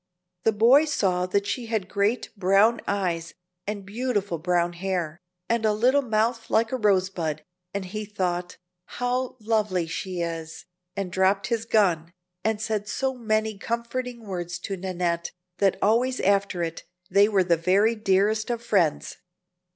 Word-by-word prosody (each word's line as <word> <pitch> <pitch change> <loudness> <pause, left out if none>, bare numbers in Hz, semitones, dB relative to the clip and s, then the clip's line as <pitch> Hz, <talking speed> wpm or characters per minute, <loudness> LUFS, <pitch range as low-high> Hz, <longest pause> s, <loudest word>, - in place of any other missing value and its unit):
The 225 - +5
boy 240 +8 +5
saw 185 -11 0
that 200 +2 0
she 230 +4 -3
had 220 -5 -1
great 200 +5 0
brown 200 +4 +4
eyes, 170 -5 -1 0.3
and 205 -2 -4
beautiful 205 -5 -2
brown 175 0 +1
hair, 175 -2 -3 0.3
and 235 -1 +1
a 215 -1 +3
little 255 +6 +3
mouth 225 -1 0
like 225 0 +2
a 260 - 0
rose 195 -4 +2
bud, 155 -4 -3 0.3
and 200 -1 -3
he 215 +3 -5
thought, 180 -3 -3 0.4
"How 250 +1 -1
lovely 210 -5 0
she 175 +2 -4
is!" 165 -1 -5 0.3
and 195 -3 -3
dropped 190 +2 +2
his 230 -2 -1
gun, 175 -7 +2 0.3
and 220 -1 0
said 215 -1 -2
so 265 +5 -1
many 220 -3 -1
comforting 235 +1 -3
words 175 -3 -4
to 195 - -3
Nannette, 175 -2 -2 0.3
that 195 -2 +3
always 240 +5 +2
after 195 -2 +1
it 165 0 -4 0.3
they 200 +1 +5
were 195 -3 +3
the 175 -1 +3
very 190 +7 +3
dearest 215 +1 +1
of 235 -1 -2
friends. 185 -9 +1
200 Hz, 155 wpm, -25 LUFS, 180-225 Hz, 0.4 s, The